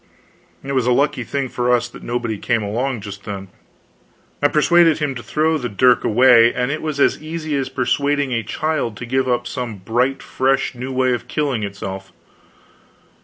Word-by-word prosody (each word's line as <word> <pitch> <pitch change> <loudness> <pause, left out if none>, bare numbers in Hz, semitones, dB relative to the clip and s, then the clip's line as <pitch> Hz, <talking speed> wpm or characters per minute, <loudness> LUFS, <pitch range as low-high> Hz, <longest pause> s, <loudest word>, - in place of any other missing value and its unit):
It 135 - -5
was 130 -3 +1
a - - +4
lucky 130 0 +1
thing 135 +3 -2
for 125 0 -1
us 120 -1 +2
that 120 - -13
nobody 115 -3 -3
came 120 -3 0
along 120 +3 -2
just 100 0 -8
then. 100 -2 -6 0.9
I 145 - +5
persuaded 165 +2 +4
him 150 -3 -1
to 120 - -7
throw 155 +7 0
the 120 -2 -3
dirk 125 +4 +3
away; 120 0 +6
and 125 +1 -1
it 155 - -3
was 155 -2 -3
as - - +2
easy 155 -1 -4
as 135 -1 -1
persuading 140 +2 0
a 115 -1 0
child 130 -1 -2
to 120 - -6
give 130 +2 0
up 125 - 0
some 125 -4 -4
bright 120 +8 -1
fresh 135 +1 0
new 125 +2 -6
way 130 -1 +1
of 120 - -4
killing 140 -7 -1
itself. 95 -1 -6
125 Hz, 185 wpm, -20 LUFS, 115-140 Hz, 0.9 s, away